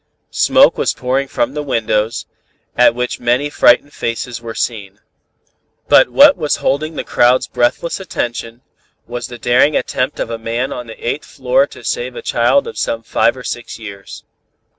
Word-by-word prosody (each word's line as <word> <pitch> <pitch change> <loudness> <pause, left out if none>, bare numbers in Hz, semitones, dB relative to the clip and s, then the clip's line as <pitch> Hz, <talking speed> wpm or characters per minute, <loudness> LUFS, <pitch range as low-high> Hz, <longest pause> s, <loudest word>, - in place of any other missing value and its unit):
Smoke - - +4
was - - 0
pouring 130 +2 -1
from 295 - -1
the 150 - -3
windows, 115 -5 -1 0.5
at 125 -1 +4
which 125 0 -3
many 125 +5 0
frightened 145 +3 +3
faces 115 +1 -4
were 115 -1 -7
seen. 105 -4 -4 0.9
"But - - +6
what 285 +1 +7
was 150 -3 0
holding 155 +3 -1
the - - -3
crowd's 125 +1 +3
breathless 125 +9 -1
attention, 120 -8 -5 0.4
was 120 +1 -5
the 120 - -9
daring 125 +5 +3
attempt 125 +2 -2
of 115 - -3
a 115 - -4
man 115 +3 -2
on 125 -1 -7
the 115 - -9
eighth 145 - -2
floor - - +1
to - - -14
save 480 +1 -3
a 475 - -7
child 280 -9 +2
of 460 - -7
some 115 0 -2
five 115 +2 +1
or 125 - -9
six 120 0 -6
years. 100 -3 -10
125 Hz, 170 wpm, -16 LUFS, 115-145 Hz, 0.9 s, what